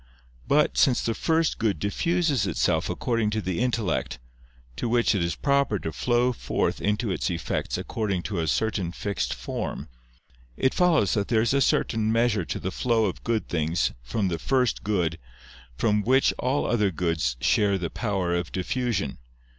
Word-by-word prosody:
But, 150 Hz, +1 st, +3 dB
since 130 Hz, -4 st, +4 dB
the 115 Hz, -, +1 dB
First 160 Hz, +6 st, +1 dB
Good 105 Hz, -6 st, +1 dB
diffuses 150 Hz, -, 0 dB
itself 90 Hz, -, +1 dB
according 115 Hz, -3 st, 0 dB
to 110 Hz, +1 st, -1 dB
the 95 Hz, -3 st, -2 dB
intellect, 120 Hz, -, -1 dB, 0.6 s
to 120 Hz, -, -2 dB
which 120 Hz, 0 st, +3 dB
it 100 Hz, -, 0 dB
is 85 Hz, -1 st, -1 dB
proper 140 Hz, -, +1 dB
to 80 Hz, -, -4 dB
flow 120 Hz, -, +1 dB
forth -, -, -1 dB
into 105 Hz, +1 st, 0 dB
its 90 Hz, -, -1 dB
effects 85 Hz, -2 st, -2 dB
according 100 Hz, -5 st, -2 dB
to 100 Hz, -5 st, -3 dB
a 80 Hz, -, -1 dB
certain 95 Hz, 0 st, 0 dB
fixed 100 Hz, +2 st, -2 dB
form; -, -, -5 dB, 0.7 s
it 130 Hz, -, +2 dB
follows 165 Hz, -, +3 dB
that 100 Hz, -2 st, 0 dB
there 110 Hz, -2 st, +2 dB
is 120 Hz, -, +1 dB
a 140 Hz, -, +3 dB
certain 110 Hz, -3 st, +1 dB
measure 115 Hz, -5 st, +2 dB
to 65 Hz, -, -4 dB
the 95 Hz, -, -3 dB
flow 115 Hz, +1 st, +1 dB
of 95 Hz, -, -4 dB
good 115 Hz, -2 st, -1 dB
things 80 Hz, +1 st, 0 dB
from 95 Hz, -, -1 dB
the 85 Hz, -2 st, -2 dB
First 125 Hz, +1 st, +1 dB
Good 90 Hz, -6 st, 0 dB, 0.6 s
from 105 Hz, -, +2 dB
Which 130 Hz, +5 st, +3 dB
all 130 Hz, +3 st, 0 dB
other 105 Hz, -4 st, +2 dB
goods 80 Hz, -8 st, -1 dB
share 100 Hz, +8 st, +2 dB
the 85 Hz, -3 st, -4 dB
power 95 Hz, -6 st, -1 dB
of 85 Hz, -2 st, -2 dB
diffusion. 100 Hz, -, -2 dB
105 Hz, 170 wpm, -26 LUFS, 90-120 Hz, 0.7 s, since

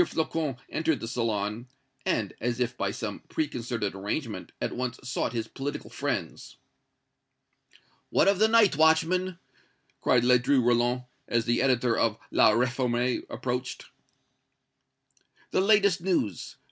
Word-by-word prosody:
Flocon 160 Hz, -, -2 dB
entered 160 Hz, -4 st, 0 dB
the 115 Hz, -, -5 dB
salon, 115 Hz, -1 st, -2 dB, 0.4 s
and, -, -, 0 dB
as 120 Hz, +1 st, -1 dB
if 125 Hz, 0 st, -1 dB
by -, -, -1 dB
some -, -, -5 dB
preconcerted 120 Hz, -8 st, -2 dB
arrangement, 105 Hz, +5 st, -4 dB
at -, -, -3 dB
once 125 Hz, 0 st, -3 dB
sought 125 Hz, -, -2 dB
his 115 Hz, -2 st, -3 dB
political 140 Hz, +4 st, -6 dB
friends. -, -, -4 dB, 1.5 s
"What -, -, +3 dB
of 195 Hz, -1 st, +3 dB
the 220 Hz, -, +5 dB
night, 220 Hz, -7 st, +5 dB
watchman?" 165 Hz, +4 st, +3 dB, 0.6 s
cried 125 Hz, -2 st, +3 dB
Ledru 125 Hz, +2 st, +4 dB
Rollin, 120 Hz, +1 st, +2 dB, 0.2 s
as 115 Hz, -1 st, +1 dB
the 120 Hz, 0 st, +1 dB
editor 125 Hz, -3 st, +2 dB
of 110 Hz, -2 st, +1 dB
"La -, -, +5 dB
Réforme" 125 Hz, +1 st, +1 dB
approached. 125 Hz, 0 st, -4 dB, 1.6 s
"The -, -, +2 dB
latest 200 Hz, -3 st, +4 dB
news! 170 Hz, -, -1 dB
125 Hz, 125 wpm, -27 LUFS, 120-160 Hz, 1.6 s, the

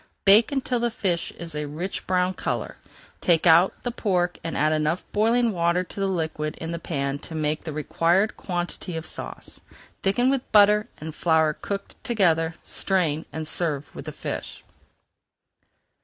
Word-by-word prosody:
Bake 210 Hz, +6 st, +7 dB
until 260 Hz, -3 st, 0 dB
the 240 Hz, 0 st, +1 dB
fish 185 Hz, -7 st, -1 dB
is 170 Hz, -1 st, -7 dB
a 150 Hz, 0 st, -3 dB
rich 170 Hz, +7 st, -5 dB
brown 185 Hz, 0 st, +2 dB
color. -, -, -3 dB, 0.4 s
Take 170 Hz, -3 st, +3 dB
out 170 Hz, +2 st, +5 dB
the 245 Hz, -, -1 dB
pork 180 Hz, -6 st, 0 dB
and 165 Hz, -, -3 dB
add 155 Hz, +1 st, +3 dB
enough 155 Hz, +4 st, 0 dB
boiling 230 Hz, +2 st, +3 dB
water 170 Hz, -1 st, +1 dB
to 185 Hz, -, -10 dB
the 195 Hz, -, +1 dB
liquid 160 Hz, -4 st, -2 dB
in 165 Hz, 0 st, -5 dB
the 170 Hz, -, -3 dB
pan 140 Hz, -4 st, -2 dB
to 160 Hz, -, -9 dB
make 155 Hz, 0 st, -1 dB
the 160 Hz, -, -3 dB
required 170 Hz, +6 st, +1 dB
quantity 175 Hz, -1 st, -4 dB
of 160 Hz, -, -5 dB
sauce. -, -, -7 dB, 0.4 s
Thicken 245 Hz, +7 st, +2 dB
with 270 Hz, -2 st, -2 dB
butter 210 Hz, 0 st, +6 dB
and 155 Hz, +1 st, -7 dB
flour 160 Hz, -1 st, +3 dB
cooked 200 Hz, +5 st, -6 dB
together, 165 Hz, -8 st, +2 dB
strain, 165 Hz, -5 st, 0 dB
and 160 Hz, -1 st, -5 dB
serve 150 Hz, -5 st, -3 dB
with -, -, -8 dB
the -, -, -5 dB
fish. -, -, -6 dB
175 Hz, 165 wpm, -25 LUFS, 160-200 Hz, 0.4 s, Bake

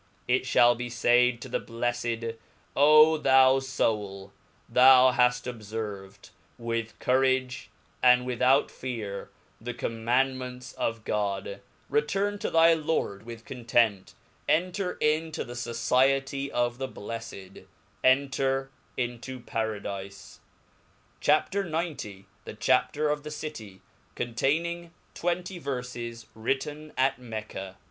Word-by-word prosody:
It 130 Hz, +1 st, +2 dB
ihalibe 120 Hz, -1 st, +3 dB
faid 120 Hz, 0 st, +3 dB
to -, -, -7 dB
the 125 Hz, -, -1 dB
bleffed, 115 Hz, -1 st, -3 dB, 0.4 s
O 155 Hz, +2 st, +7 dB
thou 130 Hz, -1 st, +5 dB
foul 105 Hz, -7 st, -2 dB, 0.2 s
/ -, -, -36 dB
that 130 Hz, 0 st, +8 dB
haft 125 Hz, 0 st, +2 dB
obferved 105 Hz, -4 st, -7 dB, 0.3 s
with 115 Hz, -1 st, -3 dB
cou 130 Hz, +1 st, +2 dB
rage, 130 Hz, -1 st, 0 dB, 0.3 s
and 125 Hz, 0 st, +5 dB
without 125 Hz, +3 st, +2 dB
fear 110 Hz, -6 st, -5 dB, 0.3 s
the 120 Hz, +1 st, -5 dB
Commandments 125 Hz, +2 st, -1 dB
of 115 Hz, -1 st, -3 dB
God, 100 Hz, 0 st, -2 dB, 0.3 s
return 195 Hz, +8 st, 0 dB
to -, -, -2 dB
thy 165 Hz, 0 st, +6 dB
Lord 150 Hz, -10 st, -2 dB
with 115 Hz, -1 st, -9 dB
content, 115 Hz, -5 st, 0 dB, 0.3 s
enter 180 Hz, +3 st, +1 dB
into 155 Hz, +1 st, -1 dB
thefociety 130 Hz, +3 st, 0 dB
of 120 Hz, -1 st, -1 dB
the 135 Hz, -, -2 dB
blefled, 100 Hz, -3 st, -8 dB, 0.4 s
en 135 Hz, +2 st, +4 dB
ter 135 Hz, 0 st, -1 dB, 0.3 s
into 125 Hz, +1 st, -4 dB
Pa:radile. 100 Hz, -4 st, -5 dB, 0.8 s
CHAP. 150 Hz, +5 st, +2 dB
XC. 160 Hz, -, -3 dB, 0.2 s
The -, -, -8 dB
(Chapter 130 Hz, +6 st, +1 dB
of 150 Hz, 0 st, 0 dB
the 150 Hz, -, -7 dB
Citjy 115 Hz, -11 st, -8 dB, 0.3 s
containing 165 Hz, +8 st, -1 dB, 0.2 s
twenty 175 Hz, +1 st, -3 dB
Verfes^ 125 Hz, -4 st, -5 dB
^ritti^i 135 Hz, +6 st, -3 dB
At 130 Hz, 0 st, +2 dB
Mecca. 110 Hz, -5 st, -7 dB
125 Hz, 110 wpm, -27 LUFS, 115-140 Hz, 0.8 s, that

